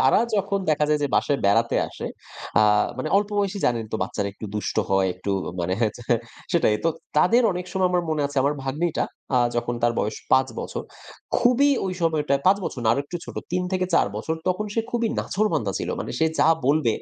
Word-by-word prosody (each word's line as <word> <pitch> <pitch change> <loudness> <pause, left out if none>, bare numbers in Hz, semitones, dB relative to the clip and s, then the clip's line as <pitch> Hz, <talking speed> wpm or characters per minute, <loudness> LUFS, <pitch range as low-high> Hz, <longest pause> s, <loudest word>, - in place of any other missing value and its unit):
তারা - - +5
যখন 200 0 0
দেখা 150 0 +2
যায় 150 -1 +2
যে 145 - +1
বাসায় 145 - +2
বেড়াতে 115 +4 +3
আসে। - - -7 0.5
আ - - +6 0.4
মানে - - -2
অল্প 205 +1 +1
বয়সী 200 0 0
জানেন 115 -2 0
তো - - +1
বাচ্চারা 100 -1 -2
একটু 105 +2 -8
দুষ্ট 105 - -3
হয় 95 -1 +3
একটু 95 +2 -5 0.3
মানে 85 +2 -1
হ্যা 110 - +3
যে 120 - -10 0.5
সেটাই 160 -11 +3
তো - - +4 0.3
তাদের 230 +10 +5
অনেক 180 0 -5
সময় 190 -1 +2
আমার 180 -1 +1
মনে 155 -2 0
আছে 140 0 -10
আমার 145 +2 +1
ভাগ্নীটা 155 +5 -1 0.3
আ - - +6 0.2
যখন 120 0 -1
তার 120 0 +3
বয়স 105 - -1 0.2
৫ 130 0 +5
বছর। - - -5 0.5
খুবই 255 +4 +4
ঐ - - -1 0.2
সময়টায় 150 -4 +1
৫ 195 +2 +6
বছর 125 - -4
না - - +3
আরেকটু 140 +6 -3
ছোট - - -10 0.2
৩ 180 - +1
থেকে 185 -1 +1
৪ - - +4
বছর 160 +9 -2
তখন 210 +4 0
সে 225 - +2
খুবই 235 -2 0
নাছোড়বান্ধা 160 - 0
ছিল। - - -4
মানে - - -5
সে 160 - +3
যা 145 - +5 0.2
বলবে 145 -5 +3
150 Hz, 210 wpm, -24 LUFS, 120-185 Hz, 0.5 s, আ